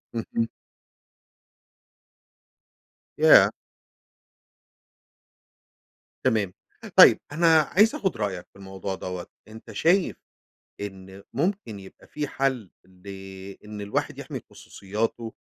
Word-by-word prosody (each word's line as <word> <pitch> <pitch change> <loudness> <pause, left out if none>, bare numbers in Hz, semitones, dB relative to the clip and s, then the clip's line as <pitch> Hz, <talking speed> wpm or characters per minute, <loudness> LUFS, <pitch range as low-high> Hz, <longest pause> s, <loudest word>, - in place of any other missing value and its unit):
اهم. 115 0 -2 2.7
ياه! - - +7 2.7
تمام 105 -5 +1 0.4
طيب، - - +9
أنا 165 +1 +5
عايز 205 +9 +3
أخد 190 - -1
رأيك 95 -4 -3
في - - -57
الموضوع 95 0 -5
دَوَّة. 90 -1 -6 0.2
أنتَ 110 +1 -12
شايف 170 - +2 0.7
إن 95 -1 -8
ممكن 145 - -2
يبقى 95 -1 -14
في 150 -1 -4
حل 130 -9 -1
لإن 95 +2 -10
الواحد 100 0 -3
يحمِي - - -6
خصوصياته؟ 110 +3 -4
105 Hz, 85 wpm, -25 LUFS, 95-135 Hz, 2.7 s, طيب